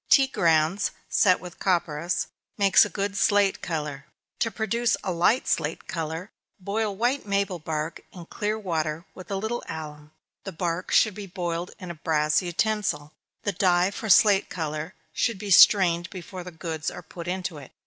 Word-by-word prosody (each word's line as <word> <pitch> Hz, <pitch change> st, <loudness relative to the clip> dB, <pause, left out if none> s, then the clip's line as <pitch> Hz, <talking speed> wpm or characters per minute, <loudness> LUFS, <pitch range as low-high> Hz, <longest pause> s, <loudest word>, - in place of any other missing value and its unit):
Tea 275 Hz, -, +7 dB
grounds, 170 Hz, -5 st, +2 dB, 0.2 s
set 185 Hz, -3 st, +4 dB
with 180 Hz, -1 st, -11 dB
copperas, 170 Hz, -2 st, 0 dB, 0.3 s
makes 200 Hz, -2 st, +6 dB
a 205 Hz, -, -2 dB
good 200 Hz, +2 st, -3 dB
slate 200 Hz, 0 st, +3 dB
color. 150 Hz, -4 st, -4 dB, 0.3 s
To 230 Hz, -, +1 dB
produce 230 Hz, +2 st, 0 dB
a 190 Hz, -, -1 dB
light 180 Hz, +9 st, +2 dB
slate 160 Hz, 0 st, -1 dB
color, 165 Hz, +4 st, -4 dB, 0.3 s
boil 205 Hz, +2 st, -2 dB
white 240 Hz, +3 st, 0 dB
maple 200 Hz, -2 st, 0 dB
bark 155 Hz, +1 st, -4 dB
in 175 Hz, -2 st, -10 dB
clear 210 Hz, +4 st, -2 dB
water, 165 Hz, -5 st, -2 dB
with 185 Hz, -, -11 dB
a 200 Hz, -, -2 dB
little 220 Hz, +5 st, -3 dB
alum 150 Hz, -1 st, -7 dB, 0.3 s
the 195 Hz, -, -6 dB
bark 170 Hz, +2 st, -2 dB
should 215 Hz, -, +4 dB
be 205 Hz, 0 st, -8 dB
boiled 175 Hz, -1 st, -3 dB
in 180 Hz, -3 st, -7 dB
a -, -, -5 dB
brass 155 Hz, -1 st, +1 dB
utensil. 175 Hz, -4 st, -1 dB, 0.3 s
The 205 Hz, -, 0 dB
dye 180 Hz, 0 st, +2 dB
for 220 Hz, +2 st, -6 dB
slate 200 Hz, 0 st, +5 dB
color 160 Hz, +1 st, -4 dB, 0.2 s
should 230 Hz, -4 st, 0 dB
be 200 Hz, +1 st, -5 dB
strained 175 Hz, -2 st, +6 dB
before 185 Hz, -1 st, -8 dB
the 180 Hz, -, -8 dB
goods 160 Hz, -2 st, -4 dB
are -, -, -9 dB
put 170 Hz, -1 st, -9 dB
into 180 Hz, -3 st, -3 dB
it. 135 Hz, -, -13 dB
180 Hz, 170 wpm, -26 LUFS, 160-200 Hz, 0.3 s, Tea